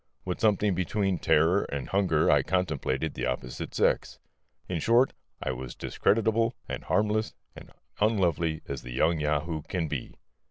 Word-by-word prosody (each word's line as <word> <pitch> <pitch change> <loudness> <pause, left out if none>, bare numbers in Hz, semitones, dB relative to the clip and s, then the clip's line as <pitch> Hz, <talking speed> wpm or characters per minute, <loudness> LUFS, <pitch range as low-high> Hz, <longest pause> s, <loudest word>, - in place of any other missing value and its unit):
With 90 -1 -3
something 105 -2 +3
between 95 +1 0
terror 80 +5 +3
and 70 -2 -4
hunger 90 -5 +3
I 75 - +5
contemplated 80 -3 -1
the - - -2
opposite 65 0 -4
sex. - - +1 0.5
In 90 -3 -2
short, 120 - +4 0.3
I 65 - -1
was 65 -1 -6
discreditable 115 +2 +1
and - - -5
harmless 110 +1 +1 0.2
and - - -12 0.3
unlovely 85 -7 +1
as - - -4
the - - -8
young 80 +5 +2
Yahoo 75 +2 -1
can 85 +1 -3
be. 75 -4 -5
85 Hz, 150 wpm, -28 LUFS, 75-105 Hz, 0.5 s, I